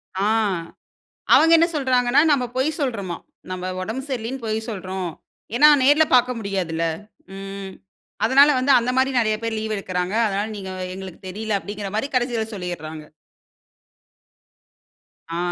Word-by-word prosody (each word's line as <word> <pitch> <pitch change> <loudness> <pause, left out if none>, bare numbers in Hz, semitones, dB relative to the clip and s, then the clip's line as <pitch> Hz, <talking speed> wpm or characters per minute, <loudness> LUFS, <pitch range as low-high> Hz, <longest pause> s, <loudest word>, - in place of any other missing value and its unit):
ஆ, 195 +1 0 1.1
அவங்க 325 +1 +5
என்ன 335 +1 +4
சொல்றாங்கன்னா, 255 -2 +3
நம்ம 265 -4 +2
பொய் 265 +4 +2
சொல்றோம்மா. 205 - -2 0.3
'நம்ம 185 0 -4
ஒடம்பு 220 +8 -4
சரியில்லன்னு 250 0 -4
பொய் 215 0 -1
சொல்றோம்.' 190 -4 -4 0.4
ஏன்னா, 295 +5 +7 0.2
நேர்ல 295 +4 +5
பார்க்க 250 0 +3
முடியாதுல்ல. 185 -6 -2 0.5
ம் 195 0 -7 0.5
அதனால 275 +5 +6
வந்து 265 +2 +2
அந்த 240 +1 -2
மாதிரி 265 +1 +3
நெறைய 215 -2 +1
பேர் 225 -1 -2
லீவ் 220 0 -2
எடுக்கிறாங்க. 185 0 -3
அதனால, 200 +1 -1
நீங்க 190 -1 -6 0.2
எங்களுக்கு 190 -2 -9
தெரியல 215 +2 -2
அப்படிங்கிற 205 0 -6
மாரி 220 +6 -1
கடைசியில 240 -3 0
சொல்லிடுறாங்க. 160 -5 -6 2.2
ஆ. 165 - -4
215 Hz, 130 wpm, -22 LUFS, 190-250 Hz, 2.2 s, ஏன்னா